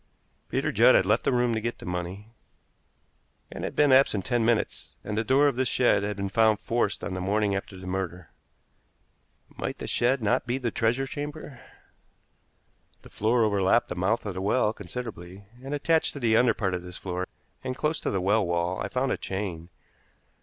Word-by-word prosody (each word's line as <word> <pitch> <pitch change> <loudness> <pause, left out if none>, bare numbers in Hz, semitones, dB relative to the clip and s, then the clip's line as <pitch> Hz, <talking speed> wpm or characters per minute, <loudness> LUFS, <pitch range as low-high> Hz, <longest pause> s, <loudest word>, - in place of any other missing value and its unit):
Peter - - 0
Judd 120 +4 +6
had - - +4
left 105 +4 +2
the - - +3
room 120 -1 +2
to 110 - -1
get 120 +2 -3
the - - -11
money, 90 +4 -5 1.2
and - - -7
had - - -4
been 145 -2 +4
absent 130 -7 +4
ten 120 -2 +1
minutes; 115 -1 -1
and 105 - -4
the 110 - 0
door 135 +5 +4
of 135 -4 0
this 130 0 +1
shed 125 -5 +3
had 105 0 -3
been 100 0 -2
found 110 +1 +3
forced 110 -2 -1
on - - -3
the 95 - -3
morning 100 +1 +1
after 100 -1 -5
the 90 - -10
murder. 90 -1 -4 1.3
Might - - -4
the - - -6
shed 125 +1 +1
not 120 +4 +1
be 120 +2 0
the 120 -3 -2
treasure 120 +5 +1
chamber? 145 -1 -7 1.4
The - - -13
floor 115 +3 +2
overlapped 100 -3 +2
the - - -4
mouth 95 +7 0
of 100 - -3
the 95 - -5
well 105 +2 +2
considerably, 100 -3 -8 0.2
and 135 - -6
attached 160 +2 +1
to 140 - -7
the 115 -3 +2
under 115 -1 +4
part 95 -3 -1
of 90 - -2
this 90 0 -9
floor, 90 0 -4 0.4
and 130 -1 -3
close 150 +2 0
to - - -2
the 95 - 0
well 105 +3 +3
wall, 85 0 -1
I - - -2
found 130 +1 -1
a - - 0
chain. 90 -4 -5
110 Hz, 200 wpm, -27 LUFS, 95-125 Hz, 1.4 s, Judd